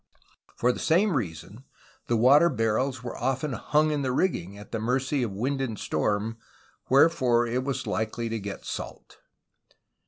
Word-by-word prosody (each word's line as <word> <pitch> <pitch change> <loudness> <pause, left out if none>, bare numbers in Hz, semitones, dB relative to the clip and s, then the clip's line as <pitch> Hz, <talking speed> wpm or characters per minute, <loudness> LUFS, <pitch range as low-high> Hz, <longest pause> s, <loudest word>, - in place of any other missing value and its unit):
For 125 - +2
the - - -6
same 180 +3 +2
reason, 105 - -5 0.4
the 120 - +2
water 140 +9 +6
barrels 125 0 -1
were 125 - -5
often 135 +3 -1
hung 155 +4 +1
in 150 -1 -1
the 130 -2 -1
rigging, 100 - -1
at 105 - -12
the 115 - -2
mercy 130 +4 0
of 120 - 0
wind 130 +8 -2
and 115 -5 -3
storm, 105 +2 -1 0.5
wherefore 130 -4 +4
it 125 +2 -1
was 140 0 -3
likely 110 +2 -2
to 115 0 -3
get 100 -1 -7
salt. - - -7
125 Hz, 160 wpm, -27 LUFS, 110-140 Hz, 0.5 s, water